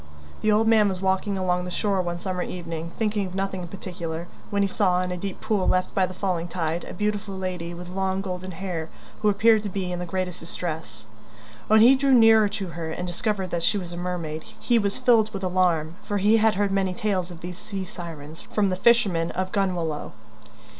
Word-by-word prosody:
The 215 - +3
old 215 +2 +3
man 215 -2 +5
was 185 -1 -3
walking 190 +1 0
along 180 -1 0
the 180 - -5
shore 195 +1 0
one 175 -1 -3
summer 180 0 -3
evening, 170 -2 -5
thinking 210 -3 0
of 180 - -8
nothing 195 -1 -2
in 175 - -6
particular, 170 -3 -6 0.2
when 200 -1 +1
he - - +2
saw, 190 -3 +2
in 180 - -3
a - - -1
deep 190 +2 -5
pool 215 -4 0
left 185 0 +1
by 190 -1 +2
the 185 - -8
falling 180 -3 -1
tide, 165 -1 -2
a - - -7
beautiful 210 0 -2
lady 180 -2 -4
with 175 +1 -8
long 190 +1 -1
golden 185 -1 -5
hair 170 -4 -4 0.3
who 210 - +4
appeared 215 +2 +4
to 205 - -4
be 185 -1 -3
in 175 - -3
the 180 - -4
greatest 180 0 -3
distress. 160 -10 -5 0.6
When 215 0 +6
he 245 +4 +8
drew 270 0 +4
nearer 225 -3 +7
to 195 -2 -4
her 165 -1 -5
and 180 +3 -4
discovered 190 +1 -2
that 170 - -1
she 205 - +2
was 175 -3 -5
a - - -6
mermaid 170 -3 -3 0.2
he 240 -2 +3
was 200 -2 -1
filled 230 -4 +4
with 195 -1 -5
alarm, 175 -3 +1
for 205 -1 -2
he 210 +3 +4
had 220 -1 +3
heard 200 0 +1
many 190 -2 +1
tales 190 -3 -1
of 175 -2 -10
these 180 +2 -7
sea 195 -3 -5
sirens 165 -3 -8
from 205 -2 0
the - - +1
fishermen 190 -7 +3
of 185 0 -3
Gunwalloe. 175 -6 -1
185 Hz, 220 wpm, -25 LUFS, 175-205 Hz, 0.6 s, he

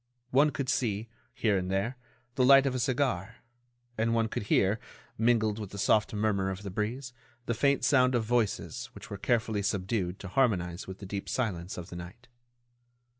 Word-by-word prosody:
One 145 +4 +5
could 140 -2 -3
see, 115 -4 -1 0.2
here 105 -4 +1
and 90 0 -4
there, 100 +7 0 0.4
the 130 - +2
light 135 +1 +7
of 135 - +1
a 130 - -1
cigar, 120 -5 0 0.6
and 115 +1 +2
one 115 -1 +1
could - - -3
hear, 100 +3 +3 0.4
mingled 110 -2 +2
with 105 -3 -5
the 100 - -9
soft 105 +2 +3
murmur 105 -2 0
of 95 +1 -5
the 100 - -5
breeze, 120 +6 -3 0.3
the 115 - 0
faint 140 +5 +2
sound 130 -2 +4
of 120 - +2
voices 110 -8 -1
which - - -11
were 100 - -4
carefully 110 -3 +1
subdued 95 -2 -1
to 100 - -8
harmonize 95 -6 0
with 95 0 -7
the 100 - -9
deep 100 +1 -5
silence 95 -8 -2
of 85 -2 -8
the - - -6
night. 95 +9 -10
110 Hz, 185 wpm, -29 LUFS, 95-120 Hz, 0.6 s, light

